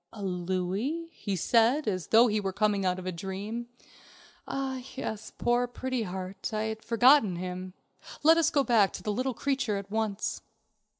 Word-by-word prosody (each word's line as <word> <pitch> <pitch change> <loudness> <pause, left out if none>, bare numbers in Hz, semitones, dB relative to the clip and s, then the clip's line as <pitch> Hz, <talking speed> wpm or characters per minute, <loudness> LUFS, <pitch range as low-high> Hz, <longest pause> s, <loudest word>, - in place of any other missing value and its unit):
"A 210 - -8
louis," 190 - -2
he 200 -10 -4
said, 235 - +3
as 185 -4 -1
though 230 +2 +6
he 215 -3 +1
were 195 -2 -2
coming 205 0 +1
out 180 0 +1
of 185 - -7
a 185 - -1
dream. 200 +6 -5 0.8
"Ah, 265 -1 -3
yes, 220 -5 -5
poor 240 +1 +2
Pretty 255 0 -3
Heart. 190 0 -5
I 215 - 0
had 220 0 -4
forgotten 235 -3 +5
him. 185 +1 -6 0.5
Let 325 +2 +7
us 320 - +3
go 290 -4 +2
back 225 -6 +3
to - - -7
the 210 - -1
little 255 +3 -1
creature 265 -7 0
at 200 0 -7
once." 220 -2 -2
215 Hz, 175 wpm, -29 LUFS, 190-245 Hz, 0.8 s, Let